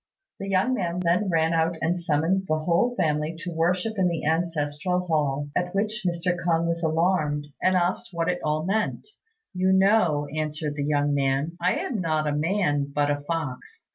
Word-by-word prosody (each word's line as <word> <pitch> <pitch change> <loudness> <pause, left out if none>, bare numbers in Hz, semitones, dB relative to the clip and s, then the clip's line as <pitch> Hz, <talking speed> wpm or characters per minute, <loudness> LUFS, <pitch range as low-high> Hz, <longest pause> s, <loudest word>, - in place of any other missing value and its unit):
The 195 - -5
young 195 +7 +2
man 180 -6 -1
then 180 +3 +1
ran 165 -1 +2
out 165 +1 +1
and 175 +2 0
summoned 175 +3 0
the 155 - +1
whole 170 +10 +1
family 155 -3 0
to 175 +1 -5
worship 180 +6 0
in 185 - +3
the 170 -3 -2
ancestral 160 +1 0
hall, 145 -3 0
at 180 +1 -1
which 215 +1 0
Mr. 175 +1 0
K'ung 170 -1 0
was 170 0 -1
alarmed, 160 -3 +1
and 185 0 +3
asked 180 0 0
what 170 -2 -2
it 180 0 0
all 155 +1 0
meant. 210 +3 -1 0.5
"You 185 +1 +1
know," 190 -6 +3
answered 155 -1 -2
the 145 -1 -3
young 145 -1 +1
man, 140 +3 0
"I - - +2
am 225 -7 -2
not 155 -2 0
a 150 - 0
man 150 -4 0
but 145 0 +1
a 145 0 -2
fox. 145 -4 -5
165 Hz, 185 wpm, -25 LUFS, 150-180 Hz, 0.5 s, in